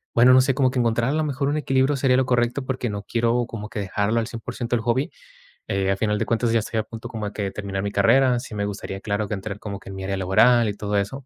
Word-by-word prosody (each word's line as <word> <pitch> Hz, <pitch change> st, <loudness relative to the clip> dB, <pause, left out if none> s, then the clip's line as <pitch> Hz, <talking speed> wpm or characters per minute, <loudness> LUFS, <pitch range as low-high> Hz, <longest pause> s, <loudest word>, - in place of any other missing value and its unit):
bueno, 125 Hz, +2 st, +7 dB
no 130 Hz, -, +7 dB
sé, 130 Hz, 0 st, +1 dB
como 130 Hz, -2 st, +2 dB
que 130 Hz, -, -1 dB
encontrar 120 Hz, +1 st, +1 dB
a -, -, -1 dB
lo 155 Hz, 0 st, +1 dB
mejor 140 Hz, -1 st, -1 dB
un 150 Hz, -, 0 dB
equilibrio 135 Hz, -1 st, +2 dB
sería 130 Hz, -1 st, +3 dB
lo 130 Hz, -, +2 dB
correcto 125 Hz, +2 st, 0 dB
porque 130 Hz, -2 st, -2 dB
no 105 Hz, -1 st, -5 dB
quiero 120 Hz, +2 st, +1 dB
como 105 Hz, -3 st, -7 dB
que -, -, -8 dB
dejarlo 105 Hz, +3 st, 0 dB
al 115 Hz, -, -1 dB
100% 120 Hz, +1 st, -4 dB
el 115 Hz, -, -1 dB
hobby, 120 Hz, +5 st, 0 dB, 0.6 s
eh, 95 Hz, -2 st, 0 dB
al 95 Hz, -, +1 dB
final 105 Hz, 0 st, 0 dB
de -, -, 0 dB
cuentas 115 Hz, 0 st, +1 dB
ya 115 Hz, -, +4 dB
estoy 110 Hz, +1 st, -2 dB
a -, -, 0 dB
punto 115 Hz, +1 st, -9 dB
como 110 Hz, -2 st, -4 dB
de 100 Hz, -2 st, -3 dB
terminar 100 Hz, -1 st, -4 dB
mi 100 Hz, -, -3 dB
carrera. 125 Hz, +5 st, +4 dB
Sí 120 Hz, -2 st, -9 dB
me 100 Hz, -1 st, -2 dB
gustaría, 95 Hz, -1 st, -5 dB
claro, 100 Hz, 0 st, -2 dB
que -, -, -4 dB
entrar 100 Hz, +1 st, -5 dB
como 100 Hz, -2 st, -6 dB
que -, -, -12 dB
en 95 Hz, -, -7 dB
mi 95 Hz, -, -6 dB
área 95 Hz, 0 st, -2 dB
laboral 110 Hz, +5 st, +4 dB
y 100 Hz, -, -4 dB
todo 105 Hz, 0 st, -3 dB
eso. 125 Hz, +7 st, -3 dB
115 Hz, 285 wpm, -23 LUFS, 100-125 Hz, 0.6 s, bueno